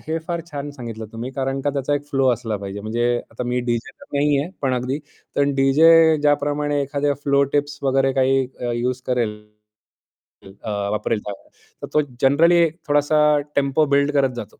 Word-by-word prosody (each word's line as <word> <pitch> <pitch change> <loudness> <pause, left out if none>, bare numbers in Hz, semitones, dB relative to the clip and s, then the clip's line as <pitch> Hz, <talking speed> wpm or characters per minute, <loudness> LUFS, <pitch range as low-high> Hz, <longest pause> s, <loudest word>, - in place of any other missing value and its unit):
हे 160 +1 -3
फार 170 -1 -2
छान 145 0 -5
सांगितलं 115 -5 -7
तुम्ही 120 +3 -5
कारण 135 +1 -2
का 145 - +1
त्याचा 140 +1 -1
एक 145 0 -3
फ्लो 135 -2 +1
असला 115 -2 -3
पाहिजे. 100 0 -7
म्हणजे 115 +3 -2 0.3
आता 115 +2 -6
मी 125 +1 -1
डीजे 120 -1 -2
तर - - -12
नाहीये, 145 +2 +1
पण 135 - +1
अगदी 130 +3 -2
कारण 145 -1 -3
डीजे 160 +4 +5
ज्याप्रमाणे 145 0 +1
एखाद्या 140 +1 -1
फ्लो 140 0 +3
टिप्स 145 0 -1
वगैरे 135 0 +2
काही 135 0 +2
अ, 120 -1 -2
यूज 125 +2 -2
करेल. 120 -4 0 1.3
अ, 110 - -5 0.2
वापरेल 105 +1 -1
त्या 105 - -4 0.5
तर - - -3
तो 150 - +4 0.2
जनरली 170 +5 +5 0.2
थोडासा 145 +1 +2 0.4
टेम्पो 140 +2 +2
बिल्ड 140 +1 +2
करत 140 -2 +3
जातो. 110 - -8
135 Hz, 175 wpm, -21 LUFS, 125-145 Hz, 1.3 s, डीजे